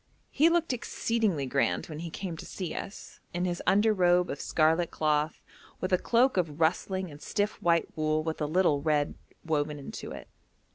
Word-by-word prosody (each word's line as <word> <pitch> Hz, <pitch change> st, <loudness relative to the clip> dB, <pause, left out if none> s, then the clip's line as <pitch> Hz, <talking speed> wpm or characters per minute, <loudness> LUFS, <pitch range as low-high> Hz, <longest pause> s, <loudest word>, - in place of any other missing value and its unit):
He 310 Hz, +4 st, +5 dB
looked 335 Hz, -4 st, +1 dB
exceedingly 225 Hz, -, -1 dB
grand 135 Hz, +2 st, 0 dB
when 155 Hz, -2 st, -7 dB
he 170 Hz, 0 st, -5 dB
came 175 Hz, +1 st, -5 dB
to -, -, -8 dB
see 185 Hz, -4 st, -5 dB
us, 195 Hz, -, -8 dB, 0.2 s
in 175 Hz, +1 st, 0 dB
his 175 Hz, -1 st, -2 dB
under 215 Hz, +2 st, +4 dB
robe 180 Hz, -2 st, +3 dB
of 140 Hz, -, -5 dB
scarlet 160 Hz, +2 st, +2 dB
cloth, 150 Hz, 0 st, 0 dB, 0.4 s
with 185 Hz, 0 st, -2 dB
a 180 Hz, -, +4 dB
cloak 245 Hz, 0 st, +3 dB
of 160 Hz, -4 st, -1 dB
rustling 185 Hz, +2 st, 0 dB
and 145 Hz, +1 st, -12 dB
stiff 205 Hz, 0 st, -2 dB
white 170 Hz, -1 st, +3 dB
wool 155 Hz, 0 st, +1 dB
with 160 Hz, 0 st, -3 dB
a 150 Hz, -, +1 dB
little 155 Hz, -3 st, +2 dB
red 150 Hz, -1 st, +1 dB, 0.3 s
woven 150 Hz, -2 st, 0 dB
in 140 Hz, -, -8 dB, 0.2 s
it. -, -, -9 dB
170 Hz, 185 wpm, -29 LUFS, 155-190 Hz, 0.4 s, He